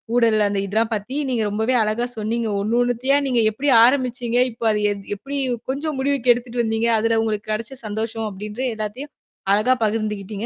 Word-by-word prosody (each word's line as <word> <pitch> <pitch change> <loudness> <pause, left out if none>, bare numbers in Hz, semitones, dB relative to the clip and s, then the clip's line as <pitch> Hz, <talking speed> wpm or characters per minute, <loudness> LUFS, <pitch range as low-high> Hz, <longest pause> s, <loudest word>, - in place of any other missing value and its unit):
ஊடல் 225 -3 +4
அந்த 200 -1 -1
இதெல்லாம் 220 +3 0
பத்தி, 215 +8 -5
நீங்க 240 -3 0
ரொம்பவே 220 +5 0
அழகா 225 +3 -1
சொன்னீங்க. 225 +2 -1
ஒண்ணு, 220 +3 0
ஒண்ணுத்தியா 245 +3 +1
நீங்க 245 -3 +2
எப்பிடி 275 +5 0
ஆரம்பிச்சீங்க, 245 -2 0
இப்ப 230 0 -6
அது 210 0 0 0.4
எப்பிடி 280 +5 -5 0.3
கொஞ்சம் 290 +1 -3
முடிவுக்கு 265 -3 +3
எடுத்துட்டு 240 0 -3
வந்தீங்க, 225 +1 0
அதுல 225 0 +2
உங்களுக்குக் 215 -1 -2
கெடச்ச 230 +5 -5
சந்தோஷம், 220 +1 -3
அப்பிடீன்ற 210 +5 -6
எல்லாத்தையும் 220 +7 -6 0.4
அழகா 240 +5 +3
பகிர்ந்துகிட்டீங்க. 210 -1 -3
230 Hz, 160 wpm, -21 LUFS, 215-250 Hz, 0.4 s, ஊடல்